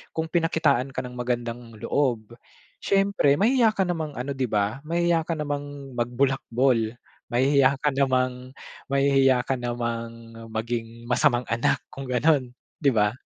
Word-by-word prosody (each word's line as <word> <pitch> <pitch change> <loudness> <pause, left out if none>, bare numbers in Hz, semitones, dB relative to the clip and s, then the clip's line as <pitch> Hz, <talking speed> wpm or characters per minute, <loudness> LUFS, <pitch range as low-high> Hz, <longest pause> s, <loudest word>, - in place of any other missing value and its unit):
kung 160 - -1
pinakitaan 160 -6 +2
ka 130 - -4
ng 125 - -8
magandang 120 -1 -4
loob, 120 -3 -1 0.5
siyempre 195 -7 +2
mahiya 230 0 +4
ka 195 - +2
namang 160 -4 -3
ano 130 +3 -4
'di 130 - +1
ba, 105 +4 0
mahiya 170 -1 +1
ka 170 - 0
namang 145 -2 -5
magbulakbol, 120 -1 +1 0.4
mahihiya 135 +2 +4
ka 150 - +4
namang 130 -1 0 0.3
mahihiya 135 -2 +3
ka 135 - 0
namang, 115 -1 -4 0.2
maging 115 +1 -4
masamang 125 -1 +3
anak 115 +1 +1
kung 135 - -7
gano'n, 130 0 +2 0.3
'di 140 - +4
ba? 105 -1 +3
130 Hz, 135 wpm, -25 LUFS, 120-145 Hz, 0.5 s, mahiya